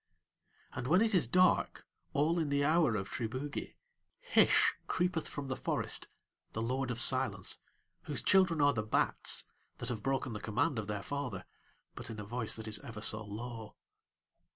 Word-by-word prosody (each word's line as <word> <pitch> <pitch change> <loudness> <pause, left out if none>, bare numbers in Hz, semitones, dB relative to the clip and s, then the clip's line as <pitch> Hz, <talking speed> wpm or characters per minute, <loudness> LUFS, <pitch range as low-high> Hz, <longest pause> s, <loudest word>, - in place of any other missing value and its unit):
And 125 0 -5
when 180 +7 +4
it 225 -1 0
is 175 -10 +3
dark, 185 +9 +2 0.3
all 160 +4 +1
in 155 -3 -1
the 140 0 +1
hour 155 -6 +3
of 95 -2 -3
Triboogie, 130 +7 -5 0.4
Hish - - +4
creepeth 180 -2 -1
from 145 -2 -6
the 130 - -2
forest, - - -1 0.5
the 110 - -3
Lord 130 +2 -2
of 120 -1 -1
Silence, 125 -6 +5 0.5
whose - - -3
children 185 -5 +4
are 145 0 +4
the 115 - -1
bats, 110 - +1 0.3
that - - -5
have 115 -4 -4
broken 135 0 -1
the 105 - -5
command 125 +4 0
of 105 - -5
their 105 -1 -4
father, 135 -10 -4 0.5
but - - -8
in 110 -2 -7
a - - -5
voice 115 +1 -1
that 110 0 -7
is 105 -1 -1
ever 110 0 -9
so 110 0 -1
low. 110 +1 -8
125 Hz, 175 wpm, -33 LUFS, 110-145 Hz, 0.5 s, Silence